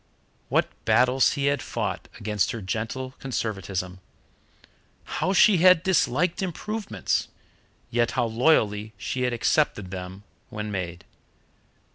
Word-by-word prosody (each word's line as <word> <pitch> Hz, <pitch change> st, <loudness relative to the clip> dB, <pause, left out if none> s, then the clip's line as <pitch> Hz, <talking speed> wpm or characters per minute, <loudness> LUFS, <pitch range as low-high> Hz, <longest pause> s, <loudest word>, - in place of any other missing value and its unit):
What -, -, +2 dB, 0.2 s
battles 125 Hz, +1 st, +4 dB
he 140 Hz, -1 st, -1 dB
had 140 Hz, 0 st, +1 dB
fought -, -, -3 dB
against 105 Hz, -2 st, 0 dB
her 115 Hz, -, -5 dB
gentle 115 Hz, +7 st, -3 dB
conservatism! 95 Hz, -7 st, -3 dB, 1.0 s
How 185 Hz, -, -2 dB
she 195 Hz, 0 st, +6 dB
had 180 Hz, 0 st, +6 dB
disliked 180 Hz, -, +1 dB
improvements, 210 Hz, +4 st, -2 dB, 0.6 s
yet 120 Hz, 0 st, +2 dB
how -, -, +3 dB
loyally 110 Hz, -4 st, +2 dB
she 125 Hz, +6 st, -3 dB
had 125 Hz, 0 st, +1 dB
accepted 115 Hz, -6 st, +1 dB
them 95 Hz, +1 st, -7 dB, 0.3 s
when 105 Hz, 0 st, -5 dB
made! 90 Hz, -3 st, -5 dB
120 Hz, 115 wpm, -25 LUFS, 100-150 Hz, 1.0 s, she